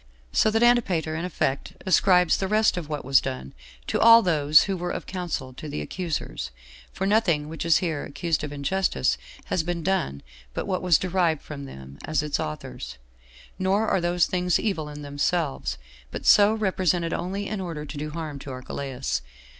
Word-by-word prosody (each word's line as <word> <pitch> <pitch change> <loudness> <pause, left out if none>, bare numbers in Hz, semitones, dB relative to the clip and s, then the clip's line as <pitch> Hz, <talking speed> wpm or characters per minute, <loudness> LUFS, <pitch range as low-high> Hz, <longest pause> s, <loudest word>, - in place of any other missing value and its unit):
So - - +3
that 225 +2 +2
Antipater 190 -10 +3
in 165 +2 -3
effect 140 -6 -2
ascribes 180 -2 +4
the 190 - -1
rest 215 0 +3
of 170 -4 -5
what 150 -3 -4
was 135 0 +5
done 65 +1 -5 0.3
to - - -1
all 230 0 +8
those 155 -4 +5
who 195 - -2
were 175 0 -3
of - - -4
counsel 170 -8 -4
to 150 +4 -8
the 75 - -4
accusers; 145 - -4 0.4
for 190 - -3
nothing 195 -8 +2
which 165 +1 -4
is 165 - +6
here 155 -4 -2
accused 160 +1 -2
of 150 - -4
injustice 145 - 0 0.3
has 180 - 0
been 170 0 -3
done 155 - -1 0.3
but - - -2
what 185 -2 -1
was 180 -4 +5
derived 180 -4 0
from 140 -2 -7
them 65 - -11
as 155 -2 0
its 150 -1 -1
authors; 60 -5 -6 0.6
nor 195 +4 +2
are 190 - +2
those 175 0 +2
things 180 -1 +1
evil 165 -9 -2
in 150 0 -8
themselves, 145 - -1 0.3
but - - -7
so 205 0 +7
represented 185 -5 0
only 195 +3 -3
in 210 -2 -3
order 165 -5 -5
to 150 - -8
do 150 +1 -4
harm 155 -2 -5
to 140 - -9
Archelaus. 130 - -4
165 Hz, 185 wpm, -25 LUFS, 145-185 Hz, 0.6 s, all